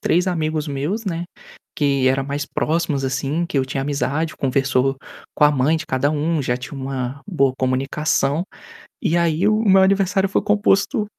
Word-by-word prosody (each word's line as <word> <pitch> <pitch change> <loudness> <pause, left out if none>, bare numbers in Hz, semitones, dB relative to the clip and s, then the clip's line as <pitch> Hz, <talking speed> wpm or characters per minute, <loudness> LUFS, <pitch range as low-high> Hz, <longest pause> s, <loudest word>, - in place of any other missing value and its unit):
3 175 +3 +1
amigos 155 -3 -1
meus, 150 +11 -3
né, 170 -2 -3 0.5
que 140 -3 +1
era 135 +1 +1
mais 145 +1 -3
próximos 150 -3 -1
assim, 140 +6 -1
que 150 - -5
eu 130 - +2
tinha 135 +1 -3
amizade, 145 +3 -2
conversou 135 0 +1 0.4
com - - +4
a 150 - +6
mãe 145 +4 +2
de - - -6
cada 130 +3 0
um, 155 0 0
já 125 -1 0
tinha 125 +3 -8
uma 135 0 -4
boa 140 -9 +1
comunicação. 135 +4 0 0.6
E 165 - +1
aí 170 +2 +1
o 215 0 +3
o 220 -2 0
meu 190 0 +6
aniversário 195 0 +2
foi - - 0
composto 205 0 +2
150 Hz, 175 wpm, -21 LUFS, 135-175 Hz, 0.6 s, a